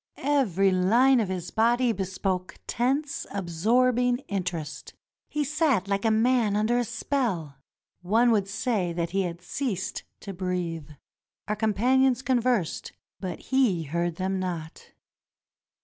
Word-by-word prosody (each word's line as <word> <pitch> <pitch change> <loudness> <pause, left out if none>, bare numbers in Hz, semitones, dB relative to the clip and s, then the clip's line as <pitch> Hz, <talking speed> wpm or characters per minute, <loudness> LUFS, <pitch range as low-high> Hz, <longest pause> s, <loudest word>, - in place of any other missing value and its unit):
Every 215 - +2
line 235 +9 +4
of 210 -5 0
his 180 -2 -4
body 240 +2 +3
bespoke 190 -2 -3
tense, 275 +4 -1
absorbing 240 +7 +2
interest. 180 -6 -4 0.3
He 300 - -1
sat 285 - +1
like 200 +1 -1
a - - +4
man 225 -1 +2
under 220 +3 +2
a - - +1
spell. 225 - -2 0.4
One 225 +7 +3
would 205 -3 +2
say 205 -4 -1
that 170 0 -2
he 195 +1 +1
had 175 -1 -4
ceased 200 -2 -3 0.2
to 200 - -7
breathe. 175 -4 -3 0.6
Our 210 - 0
companions 250 +5 +2
conversed, 245 -8 0 0.3
but 185 -3 -5
he 225 -11 +3
heard 170 +3 -2
them 190 +1 -2
not. 170 -4 -5
205 Hz, 130 wpm, -26 LUFS, 180-245 Hz, 0.6 s, line